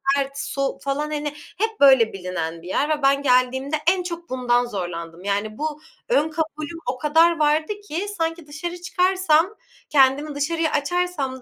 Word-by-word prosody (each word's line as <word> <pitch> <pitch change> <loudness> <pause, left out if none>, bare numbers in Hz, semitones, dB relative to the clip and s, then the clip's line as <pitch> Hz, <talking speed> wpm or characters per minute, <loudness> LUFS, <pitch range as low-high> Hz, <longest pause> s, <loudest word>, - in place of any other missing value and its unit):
sert, 275 0 -2
soğuk, 275 0 -3
falan, 290 +2 -2
hani, 295 0 -2 0.3
hep 440 +2 -1
böyle 265 -5 +6
bilinen 180 -3 -4
bir 175 - -11
yer 280 +10 0
ve 305 -1 0
ben 275 +1 +4
geldiğimde 260 +2 +2 0.2
en 370 -1 -1
çok 340 -1 -6
bundan 245 -1 +1
zorlandım. 175 -5 -6
Yani, 205 +2 -2
bu 305 0 -3 0.3
ön 320 -11 +3
kabulüm 315 0 -4
o 255 - -8
kadar 325 +4 +3
vardı 305 +5 +2
ki 345 +7 -3
sanki 330 -1 -2
dışarı 345 +4 -6
çıkarsam, 370 0 +2 0.3
kendimi 285 +1 +3
dışarıya 320 +2 0
açarsam 290 -5 -1
295 Hz, 160 wpm, -23 LUFS, 260-330 Hz, 0.3 s, böyle